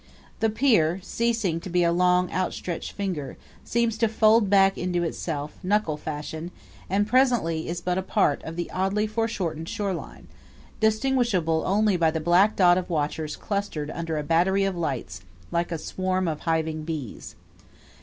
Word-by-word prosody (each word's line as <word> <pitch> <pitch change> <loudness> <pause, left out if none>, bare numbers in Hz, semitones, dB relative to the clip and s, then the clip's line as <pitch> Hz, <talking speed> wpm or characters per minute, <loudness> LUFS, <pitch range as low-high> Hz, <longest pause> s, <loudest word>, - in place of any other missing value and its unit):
The 225 - +2
pier, 210 - +3
ceasing 225 -6 0
to 185 - -8
be 175 0 +2
a 170 - +3
long, 180 +1 +2
outstretched 180 -2 -3
finger, 180 -9 -4 0.3
seems 230 -1 0
to 230 - +4
fold 220 -1 +4
back 195 -1 +5
into 175 -1 -1
itself, 155 -3 -4
knuckle 195 -4 +1
fashion, 155 +2 -6 0.4
and 200 +2 +2
presently 235 -10 +2
is 170 0 -3
but 180 +1 0
a - - -1
part 150 -5 +1
of 160 - -7
the 175 0 -4
oddly 195 +3 0
foreshortened 210 -8 -2
shoreline, 195 -4 -4 0.5
distinguishable 220 -8 +2
only 205 0 +2
by 165 -2 +3
the 160 0 -2
black 175 +6 +4
dot 180 -1 +5
of 185 - -7
watchers 155 -1 -2
clustered 200 -8 -3
under 165 -2 -3
a 150 - -2
battery 180 +5 +2
of 195 -1 0
lights, 130 - -3 0.3
like 170 +1 -1
a 165 - -1
swarm 185 +3 -2
of 155 -2 -2
hiving 160 -1 0
bees. 155 -7 -6
180 Hz, 160 wpm, -25 LUFS, 160-205 Hz, 0.5 s, back